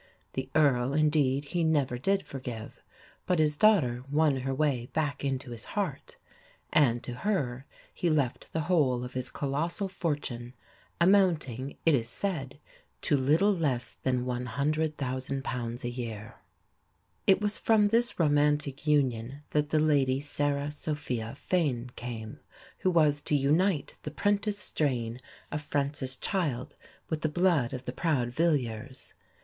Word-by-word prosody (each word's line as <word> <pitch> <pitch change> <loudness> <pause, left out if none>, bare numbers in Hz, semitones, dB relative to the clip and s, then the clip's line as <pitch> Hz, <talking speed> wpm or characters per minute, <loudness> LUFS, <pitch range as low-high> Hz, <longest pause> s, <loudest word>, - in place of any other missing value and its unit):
The 130 - -3
Earl, 135 -3 +3
indeed, 150 -3 +2
he 170 +4 -1
never 145 -6 +1
did 195 +8 +1
forgive, 125 -5 -7 0.5
but 180 - +2
his 150 -1 +3
daughter 145 - +4
won 150 -1 +3
her 135 +1 -2
way 135 -3 0
back 145 -3 -1
into 135 -2 -2
his 115 -2 -5
heart, - - -3 0.6
and 120 -5 +4
to 125 - -5
her 135 -5 -2 0.3
he 175 - 0
left 145 -6 0
the 160 - -1
whole 145 -7 +2
of 125 - -7
his 130 0 -2
colossal 160 +8 -1
fortune, 145 -9 -3 0.4
amounting, 165 - +2
it 165 - +5
is 120 -4 +1
said, 145 -6 -3 0.4
to - - +2
little 155 +10 +3
less 130 -8 -1
than 125 -1 0
£100,000 130 -1 -2
a 120 - -1
year. 115 -3 -6 0.9
It 190 - +6
was 210 0 0
from 220 -2 +4
this 230 +2 +2
romantic 145 -2 +2
union 135 -2 +1
that 150 -1 +1
the 155 - +2
Lady 140 -4 +3
Sarah 145 0 -1
Sophia 140 -6 -3
Fane 135 -8 -1
came, 115 -2 -6 0.4
who 185 - +2
was 150 -4 +3
to 150 - 0
unite 150 +3 +2
the - - -5
'prentice 205 +5 0
strain 125 - -1 0.3
of 150 - -2
Francis 140 -2 -2
Child 150 - -2 0.3
with 160 -2 -2
the 155 - +1
blood 165 -6 +2
of 130 -1 -6
the - - -4
proud 145 -8 0
Villiers. 130 -4 -1
145 Hz, 140 wpm, -29 LUFS, 125-160 Hz, 0.9 s, It